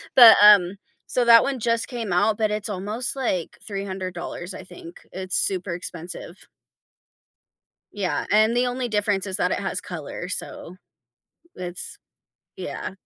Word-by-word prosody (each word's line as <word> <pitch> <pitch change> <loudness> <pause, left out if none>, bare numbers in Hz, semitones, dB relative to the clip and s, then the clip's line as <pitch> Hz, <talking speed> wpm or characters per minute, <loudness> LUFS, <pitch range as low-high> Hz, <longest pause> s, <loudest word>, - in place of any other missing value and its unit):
but, 240 -3 +10
um 200 -2 +7 0.3
so 250 - 0
that 230 -1 +8
one 275 -2 -2
just 230 0 -1
came 230 -7 -4
out, 210 +4 +2
but 215 -1 0
it's 210 0 -3
almost, 210 +7 -3
like, 190 -10 -2
$300, 190 -3 -5
I - - -9
think, 175 -1 -12
it's 185 0 -4
super 185 -2 -1
expensive. 175 0 -8 1.5
Yeah, 195 -3 -2
and 215 +2 +4
the 250 +1 +2
only 245 0 -3
difference 205 -2 0
is 190 -2 -3
that 180 - 0
it - - 0
has 185 -2 -3
color, 175 0 -7
so, 180 -1 -6 0.8
it's 180 0 -7 0.6
yeah. - - -6
200 Hz, 140 wpm, -23 LUFS, 180-225 Hz, 1.5 s, but